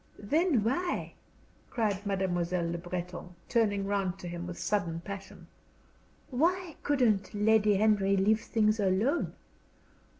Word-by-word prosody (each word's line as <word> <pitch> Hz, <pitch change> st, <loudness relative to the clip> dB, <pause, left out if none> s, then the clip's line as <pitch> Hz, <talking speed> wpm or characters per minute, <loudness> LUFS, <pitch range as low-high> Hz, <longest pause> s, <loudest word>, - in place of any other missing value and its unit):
"Then 290 Hz, -, +1 dB
why," 345 Hz, +11 st, -1 dB, 0.6 s
cried 205 Hz, -4 st, -1 dB
Mademoiselle 180 Hz, -3 st, 0 dB
Le 170 Hz, -, -3 dB
Breton, 180 Hz, 0 st, -6 dB
turning 205 Hz, -4 st, +1 dB
round 195 Hz, -2 st, -1 dB
to 180 Hz, -, -8 dB
him 175 Hz, 0 st, -5 dB
with 175 Hz, -, -6 dB
sudden 175 Hz, -6 st, -1 dB
passion 195 Hz, +1 st, -8 dB, 0.9 s
"why 340 Hz, +5 st, 0 dB
couldn't 230 Hz, -9 st, +1 dB
Lady 210 Hz, 0 st, +4 dB
Henry 200 Hz, -1 st, +3 dB
leave 215 Hz, +3 st, +3 dB
things 215 Hz, -1 st, +1 dB
alone? 205 Hz, -, +1 dB
205 Hz, 120 wpm, -30 LUFS, 185-220 Hz, 0.9 s, Lady